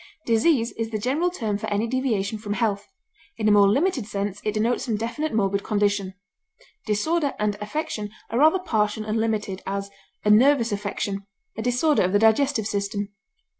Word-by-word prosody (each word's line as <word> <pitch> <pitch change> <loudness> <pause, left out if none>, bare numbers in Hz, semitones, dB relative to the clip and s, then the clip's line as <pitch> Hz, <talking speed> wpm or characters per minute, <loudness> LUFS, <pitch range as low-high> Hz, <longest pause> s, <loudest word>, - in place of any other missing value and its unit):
Disease 230 +1 +2
is 225 -1 -1
the 220 - -2
general 275 +11 0
term 220 - -3
for - - -4
any 205 +2 0
deviation 225 -4 -1
from 205 -1 -3
health; 210 -3 -1 0.5
in 215 -2 0
a - - +5
more 200 -1 +6
limited 270 - +1
sense 200 -1 -3
it 210 - -1
denotes 230 +3 +1
some 225 -4 -1
definite 235 +8 -3
morbid 200 -2 0
condition; 205 -2 0 0.7
disorder 285 +8 0
and 210 0 0
affection 210 -2 -3 0.2
are 230 - 0
rather 315 +5 +6
partial 215 - -1
and 215 +1 -1
limited; 215 -4 -1
as, 200 0 -3 0.3
a 210 - +5
nervous 240 +1 +5
affection; 200 -1 -3 0.3
a 220 - -4
disorder 250 +6 +2
of 185 +1 +1
the - - +6
digestive 225 +2 +3
system. 205 0 -2
215 Hz, 170 wpm, -24 LUFS, 205-245 Hz, 0.7 s, more